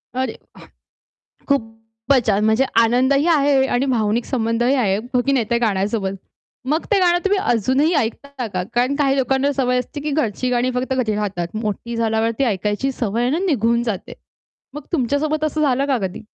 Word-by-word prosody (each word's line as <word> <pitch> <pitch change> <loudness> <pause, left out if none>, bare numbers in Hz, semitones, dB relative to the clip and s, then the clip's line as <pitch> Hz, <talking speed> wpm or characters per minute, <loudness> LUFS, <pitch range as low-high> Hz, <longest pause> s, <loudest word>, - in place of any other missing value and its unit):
अरे, 260 +1 -1 0.9
वाह! - - -36
खूपच 225 0 -1
छान! 205 0 +2
म्हणजे 220 +5 +3 0.2
आनंदही 260 +5 +2
आहे 285 -4 +3
आणि 255 +1 0
भावनिक 230 -3 0
संबंधही 240 +1 0
आहे, 200 -7 +1 0.2
हो 250 - +3
की 275 - +2
नाही 255 -5 +1
त्या 235 - +2
गाण्यासोबत? 200 -2 0 0.5
मग 305 +5 0
ते 410 - +4
गाणं 350 -1 +4
तुम्ही 395 0 +2
अजूनही 265 - +1
ऐकता 270 0 -3
का? 180 -1 -1
कारण 250 +3 +1
काही 275 -2 +1
लोकांना 270 +2 +1
सवय 250 -2 +1
असते, 290 +4 -6
की 300 +1 -3
घरची 255 -4 -1
गाणी 250 +1 +1
फक्त 255 +1 -1
घरी 240 -5 0
राहतात. 200 -5 -2 0.2
मोठी 220 +3 -4
झाल्यावरती 225 +2 0
ऐकायची 210 +3 -1
सवय 230 -3 -2
आहे 245 +1 +1
ना, 310 - +1
निघून 235 - +1
जाते. 220 -6 -4 0.6
मग 295 - -6
तुमच्या 285 -4 0
सोबत 310 +1 -1
असं 310 0 -1
झालं 275 -2 +2
का 270 -2 +2
कधी? 180 - -10
250 Hz, 180 wpm, -20 LUFS, 225-275 Hz, 0.9 s, ते